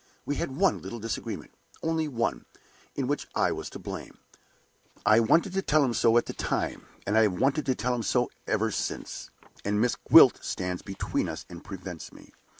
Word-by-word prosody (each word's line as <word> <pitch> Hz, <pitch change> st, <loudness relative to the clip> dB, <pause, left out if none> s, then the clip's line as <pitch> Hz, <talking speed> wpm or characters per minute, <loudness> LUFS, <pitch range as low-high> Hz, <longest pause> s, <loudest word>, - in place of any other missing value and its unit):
We 145 Hz, -, -2 dB
had 135 Hz, -, -3 dB
one 195 Hz, +2 st, +2 dB
little 120 Hz, -, -6 dB
disagreement, 115 Hz, +1 st, -5 dB, 0.3 s
only 160 Hz, -1 st, 0 dB
one, 115 Hz, -, -2 dB, 0.5 s
in 135 Hz, -, -1 dB
which 145 Hz, +3 st, -2 dB
I -, -, +3 dB
was -, -, -4 dB
to -, -, -8 dB
blame. -, -, -7 dB, 0.9 s
I 110 Hz, +1 st, +6 dB
wanted 165 Hz, -, +3 dB
to 195 Hz, -, +1 dB
tell 155 Hz, -5 st, +3 dB
him 125 Hz, -, 0 dB
so 115 Hz, 0 st, +4 dB
at 120 Hz, -, +3 dB
the -, -, -5 dB
time, -, -, -2 dB, 0.2 s
and 105 Hz, -, 0 dB
I 110 Hz, -, +6 dB
have 100 Hz, -5 st, +2 dB
wanted 135 Hz, +2 st, +1 dB
to 130 Hz, -, +2 dB
tell 125 Hz, +4 st, 0 dB
him 120 Hz, -, -1 dB
so 125 Hz, +2 st, +1 dB, 0.2 s
ever 110 Hz, 0 st, +1 dB
since; -, -, -4 dB, 0.3 s
and 105 Hz, +1 st, 0 dB
Miss 120 Hz, +2 st, +2 dB
Gwilt -, -, +7 dB
stands 90 Hz, -1 st, -3 dB
between 95 Hz, -2 st, -2 dB
us -, -, -6 dB
and 85 Hz, 0 st, -9 dB
prevents 95 Hz, -3 st, -8 dB
me. -, -, -16 dB
115 Hz, 195 wpm, -28 LUFS, 105-140 Hz, 0.9 s, Gwilt